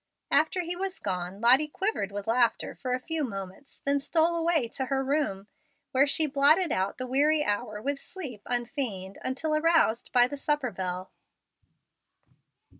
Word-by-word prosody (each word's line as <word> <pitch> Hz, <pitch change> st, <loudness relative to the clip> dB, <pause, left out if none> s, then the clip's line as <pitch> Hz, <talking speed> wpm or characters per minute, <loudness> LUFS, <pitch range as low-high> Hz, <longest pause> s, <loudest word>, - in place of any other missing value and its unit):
After 315 Hz, +5 st, +3 dB
he 350 Hz, 0 st, -4 dB
was 380 Hz, +1 st, -3 dB
gone, 180 Hz, +1 st, -4 dB
Lottie 260 Hz, +6 st, +6 dB
quivered 300 Hz, -, -2 dB
with 200 Hz, 0 st, -5 dB
laughter 230 Hz, 0 st, +1 dB
for 255 Hz, -2 st, -2 dB
a -, -, -4 dB
few 320 Hz, +3 st, -2 dB
moments; 195 Hz, +2 st, -7 dB
then 280 Hz, 0 st, +2 dB
stole 325 Hz, +4 st, +1 dB
away 330 Hz, -6 st, +1 dB
to 265 Hz, -, -3 dB
her 270 Hz, 0 st, 0 dB
room, 270 Hz, -9 st, -1 dB, 0.5 s
where 270 Hz, +2 st, +4 dB
she 310 Hz, +2 st, +4 dB
blotted 300 Hz, +5 st, +4 dB
out 190 Hz, +1 st, -1 dB
the 255 Hz, -, -4 dB
weary 295 Hz, +4 st, +2 dB
hour 210 Hz, -2 st, -2 dB
with 280 Hz, +5 st, -2 dB
sleep 275 Hz, -, -7 dB
unfeigned, 240 Hz, -6 st, -3 dB
until 305 Hz, +4 st, -1 dB
aroused 315 Hz, -7 st, +2 dB
by 245 Hz, -1 st, +5 dB
the 285 Hz, -, -6 dB
supper 290 Hz, -3 st, -1 dB
bell. 185 Hz, -1 st, -5 dB
270 Hz, 160 wpm, -28 LUFS, 220-310 Hz, 0.5 s, Lottie